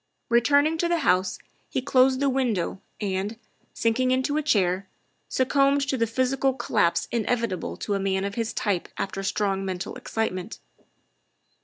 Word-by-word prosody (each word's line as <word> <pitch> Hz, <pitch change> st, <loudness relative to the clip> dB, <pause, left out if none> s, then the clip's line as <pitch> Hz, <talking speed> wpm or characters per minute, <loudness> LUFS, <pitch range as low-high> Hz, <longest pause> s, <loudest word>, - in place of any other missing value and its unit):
Returning 285 Hz, +7 st, +3 dB
to 345 Hz, -, +2 dB
the 340 Hz, -1 st, +1 dB
house, 185 Hz, +1 st, +2 dB, 0.3 s
he 270 Hz, -, -1 dB
closed 260 Hz, 0 st, +3 dB
the 280 Hz, -, +3 dB
window 240 Hz, -9 st, 0 dB, 0.2 s
and, 200 Hz, +2 st, -2 dB, 0.3 s
sinking 240 Hz, +3 st, +1 dB
into 260 Hz, +3 st, +1 dB
a 305 Hz, -, +2 dB
chair, 190 Hz, -9 st, +1 dB, 0.4 s
succumbed 275 Hz, +2 st, +3 dB
to 275 Hz, -, 0 dB
the 230 Hz, -2 st, +1 dB
physical 260 Hz, +3 st, +1 dB
collapse 170 Hz, -8 st, +1 dB
inevitable 230 Hz, -3 st, -1 dB
to 200 Hz, -2 st, -2 dB
men 195 Hz, 0 st, 0 dB
of 200 Hz, -, -3 dB
his 230 Hz, +1 st, -2 dB
type 195 Hz, -5 st, -1 dB
after 195 Hz, 0 st, -3 dB
strong 195 Hz, 0 st, 0 dB
mental 185 Hz, -1 st, -4 dB
excitement. 210 Hz, -2 st, -3 dB
230 Hz, 145 wpm, -25 LUFS, 195-265 Hz, 0.4 s, Returning